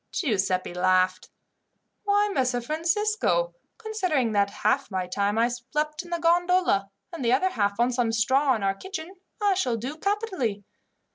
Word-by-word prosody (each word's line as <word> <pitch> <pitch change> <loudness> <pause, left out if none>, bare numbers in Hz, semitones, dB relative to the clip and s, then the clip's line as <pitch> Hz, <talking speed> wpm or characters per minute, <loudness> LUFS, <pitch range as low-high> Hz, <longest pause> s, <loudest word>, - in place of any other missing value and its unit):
Giuseppi 190 - 0
laughed. 185 +1 +1 0.8
"Why, 410 0 +3
Messer 255 -4 +1
Francisco, 420 - 0 0.2
considering 365 - -1
that 200 -1 +2
half 240 +7 0
my 185 -2 -2
time 200 +3 -1
I 230 +1 +4
slept 300 +6 -3
in 350 - -13
the 345 - -1
gondola, 345 - +2 0.2
and 325 -6 -5
the 235 - +2
other 370 +9 +2
half 200 - -1
on 240 +1 +3
some 240 -2 0
straw 260 +4 +2
in 215 - -4
our 195 0 +2
kitchen, 355 - -7 0.3
I 410 -2 +3
shall 255 -11 0
do 260 +7 -5
capitally. 375 - -1
260 Hz, 155 wpm, -26 LUFS, -, 0.8 s, I